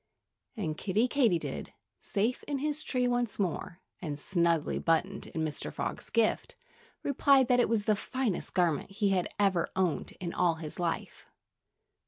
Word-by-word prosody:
And 160 -8 -2
Kiddie 210 +5 +2
Katydid, 240 -11 0 0.3
safe 225 +5 -1
in 285 - -1
his 300 +2 -2
tree 250 -2 +1
once 245 -3 0
more, 180 -2 -2 0.2
and 150 -5 -4
snugly 170 -2 +1
buttoned 175 +4 0
in 160 -1 -2
Mr. 150 - -4
Frog's - - -4
gift, 230 -2 +1 0.5
replied 275 -1 +4
that 250 -1 +5
it 245 - +3
was 220 -3 +1
the 215 - +4
finest 235 -2 -2
garment 175 -4 +2
he 200 +1 0
had 185 -2 +1
ever 190 -4 +2
owned 185 -4 0
in 175 -2 -4
all 175 -2 +2
his 160 0 -5
life. 170 -2 -3
195 Hz, 155 wpm, -30 LUFS, 170-245 Hz, 0.5 s, that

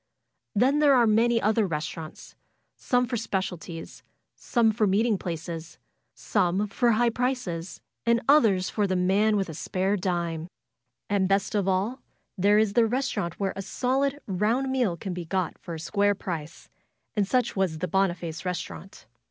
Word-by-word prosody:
Then 265 +7 +3
there 290 -2 +5
are 240 -2 +5
many 230 +2 +3
other 215 -1 +2
restaurants; 155 0 -6 0.4
some 250 0 +1
for 245 -1 -2
specialties; 180 -6 -4 0.3
some 230 -3 +2
for 215 -1 +1
meeting 215 +3 +2
places; 165 -1 -6 0.4
some 185 +4 0
for 235 +4 +2
high 235 +2 +3
prices, 225 -9 -3 0.2
and 235 0 +3
others 220 -11 +4
for 210 -2 0
the 190 - 0
man 200 +4 +3
with 195 - 0
the 160 - -8
spare 190 +5 -1
dime. 170 -4 -2 0.6
And 195 -2 +1
best 195 +2 +1
of 200 -3 0
all 195 +7 0 0.3
there 205 +2 +4
is 215 -2 +2
the 230 +1 +4
restaurant 225 -8 -2
where 195 -1 -1
a 195 - -4
solid, 265 +7 0
round 220 +8 0
meal 240 -10 +1
can 190 +2 -5
be 175 -1 -5
got 185 -1 -1
for 170 - -7
a - - -7
square 205 +5 +1
price, 165 -4 -6 0.5
and 205 -3 +1
such 250 0 +1
was 190 -5 0
the 180 +3 -2
Boniface 175 -4 -1
Eestaurant. 180 -3 -6
195 Hz, 160 wpm, -26 LUFS, 180-230 Hz, 0.6 s, there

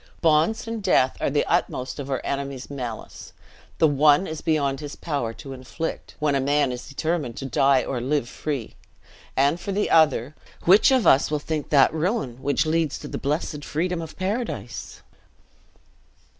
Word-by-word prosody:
Bonds, 165 +9 +2
and 225 -1 -4
death, 130 -9 +3
are - - +1
the 145 +1 +1
utmost 130 +3 -1
of 140 -1 -5
our 135 -2 -1
enemy's 140 -1 -4
malice; 125 -5 -7 0.4
the 160 - +5
one 145 +4 +4
is 155 -2 -5
beyond 140 -4 0
his 145 -1 -7
power 140 -8 -2
to 135 +3 -9
inflict, 130 +5 -6
when 150 -2 +1
a 140 - +2
man 140 0 +2
is 125 0 -7
determined 150 -4 -2
to 135 - -5
die 135 +1 +3
or 130 - -2
to 120 - -5
live 145 -4 +1
free; 140 -4 -4 0.6
and 140 +5 +3
for 200 - -4
the 205 +2 0
other, 150 -4 +4 0.3
which 195 +8 +6
of 260 -4 +3
us 135 - +5
will 150 - 0
think 150 0 -4
that 140 -1 +5
ruin, 160 - -2
which 140 +3 +1
leads 160 -2 0
to 150 - -8
the - - -5
blessed 150 +1 -2
freedom 170 +4 -2
of 160 -1 -9
paradise?" 190 - -4
145 Hz, 175 wpm, -24 LUFS, 135-165 Hz, 0.6 s, which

